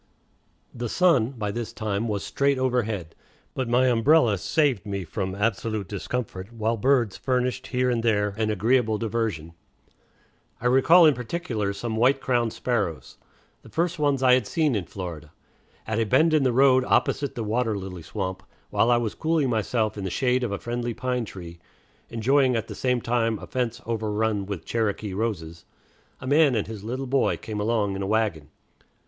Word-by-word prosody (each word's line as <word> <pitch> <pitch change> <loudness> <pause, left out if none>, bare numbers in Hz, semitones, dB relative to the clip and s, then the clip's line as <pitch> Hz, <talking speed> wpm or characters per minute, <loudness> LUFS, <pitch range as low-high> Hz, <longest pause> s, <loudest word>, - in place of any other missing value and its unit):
The 120 -1 -4
sun 165 -10 +3
by 105 -5 -3
this 115 +1 -4
time 110 0 -2
was 105 -3 -2
straight 140 -1 +1
overhead, 110 -10 -1 0.4
but 130 -3 -3
my 125 +2 +3
umbrella 120 - +4
saved 130 - +1
me 100 -2 -4
from 95 +3 -4
absolute 110 -1 -1
discomfort, 100 0 -5
while 115 0 -1
birds 120 -2 +2
furnished 125 0 -1
here 125 0 +1
and 120 -1 0
there 105 -3 +2
an 110 0 -1
agreeable 110 +2 +2
diversion. 105 -8 -3 1.1
I 120 - -9
recall 140 +8 +6
in 155 - +6
particular 120 - -3
some 110 +3 -4
white 130 +4 +3
crowned 120 -4 0
sparrows, 105 -12 -3 0.4
the - - -15
first 170 0 -1
ones 140 -3 +1
I 130 -1 +6
had 125 -4 +2
seen 155 -5 +1
in 100 -5 -1
Florida. 85 -5 -7 0.5
At 110 0 -1
a - - +3
bend 155 +10 +3
in 155 - +4
the 130 -2 +2
road 130 +1 +5
opposite 140 +1 +1
the 115 - -3
water 110 0 0
lily 95 -2 -7
swamp, 95 +2 -4 0.3
while 115 - +2
I 120 - +5
was 115 -3 -2
cooling 160 -5 0
myself 110 -1 -1
in - - -4
the 95 - -2
shade 125 +5 +1
of 120 - -2
a 100 - -2
friendly 120 0 -4
pine 125 -2 -2
tree, 85 -4 -10 0.5
enjoying 130 +3 +2
at 115 - -2
the - - -7
same 125 -2 0
time 115 -2 0
a - - -9
fence 120 -2 -2
overrun 110 -2 -1
with 100 -5 -5
Cherokee 110 -3 -2
roses, 90 -6 -3 0.6
a - - -9
man 145 -1 +4
and 105 - 0
his 110 -3 -8
little 130 +5 -4
boy 135 +1 +1
came 105 -2 -6
along 105 -2 0
in 95 - -4
a 95 - -2
wagon. 105 -9 0
115 Hz, 180 wpm, -25 LUFS, 105-125 Hz, 1.1 s, recall